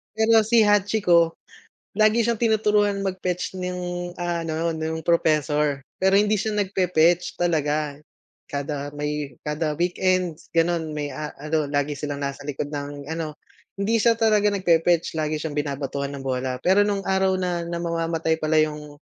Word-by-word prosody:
Pero 225 +1 +5
si 225 0 +5
Hachiko, 200 -5 +3 0.6
lagi 215 +2 +4
siyang 230 0 0
tinuturuan 210 -3 +2
mag-fetch 185 -1 -3
nung 180 -1 -4
ano 170 -1 -1
nung 160 0 -3
professor. 150 -3 +1 0.2
Pero 190 +1 +3
hindi 210 +1 +3
siya 215 +2 -2
nagfe-fetch 180 -4 +2
talaga 150 -3 0 0.5
kada 145 0 -3
may 150 -3 -4
kada 150 0 -2
weekends 180 -1 0
ganon 165 -1 +1
may 150 -1 -3
ah, 150 -1 -5
ano 155 0 -1
lagi 145 0 0
silang 145 0 -4
nasa 140 0 -4
likod 145 0 -4
ng 145 -1 -6
ano. 160 -2 -4 0.5
Hindi 220 +3 +2
siya 230 +1 +4
talaga 215 -2 +3
nagfe-fetch 170 -3 +2
lagi 155 0 -1
siyang 155 -2 -5
binabatuhan 140 -1 -3
ng 140 - -7
bola. 130 0 -2
Pero 195 +3 +4
nung 200 -1 -1
araw 190 0 +2
na 175 -2 -1
na 170 0 -3
mamamatay 165 -1 -1
pala 155 0 +2
yung, 150 -1 -3
165 Hz, 145 wpm, -24 LUFS, 150-190 Hz, 0.6 s, Pero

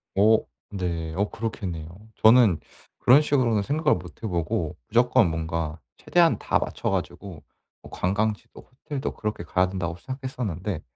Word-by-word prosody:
어 110 +3 +6 0.3
네. 85 -5 -3
어 100 +2 0
그렇겠네요. 95 -8 -4 0.3
저는 110 -6 +6 0.4
그런 130 +4 +6
식으로는 125 -8 +2
생각을 150 +6 +2
못 85 -3 -12
해 - - -1
보고 85 -5 -2
'무조건 115 -5 +4
뭔가 80 0 -3 0.2
최대한 165 - +3
다 - - +1
맞춰 - - -3
가지고 90 -6 -4 0.4
뭐 - - -14
관광지도 105 +4 -2 0.2
호텔도 140 -2 -3
그렇게 105 -5 -4
가야 90 +2 +1
된다.'고 90 -2 -3
생각했었는데 110 - -4
100 Hz, 325 characters per minute, -25 LUFS, 85-120 Hz, 0.4 s, 어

